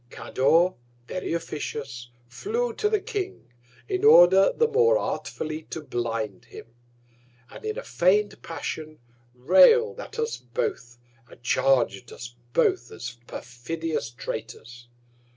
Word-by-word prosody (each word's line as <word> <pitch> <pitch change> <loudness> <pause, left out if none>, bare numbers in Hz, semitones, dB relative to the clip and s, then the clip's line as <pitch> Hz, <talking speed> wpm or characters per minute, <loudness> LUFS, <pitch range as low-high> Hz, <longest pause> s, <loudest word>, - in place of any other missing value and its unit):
Cador, 165 +11 +2 0.3
very 185 +8 -4
officious, 140 -6 -5 0.2
flew 460 - -2
to 425 -1 0
the 430 -1 +2
King, 365 - -5 0.4
in 380 -1 -2
order 190 - +7
the 465 - +2
more 470 +2 +4
artfully 155 - -4
to - - -5
blind 115 -7 -4
him; - - -11 0.9
and - - -11
in 435 +1 -3
a - - -5
feign'd 205 - +1
Passion, 155 -1 -6 0.4
rail'd 190 - +5
at - - -9
us 460 0 -2
both, 390 - -4 0.3
and 120 - -17
charg'd 125 -2 +1
us 120 +1 -9 0.2
both 120 0 +1
as 120 0 -8
perfidious 150 +2 -4
Traitors. 120 +1 -8
160 Hz, 120 wpm, -25 LUFS, -, 0.9 s, order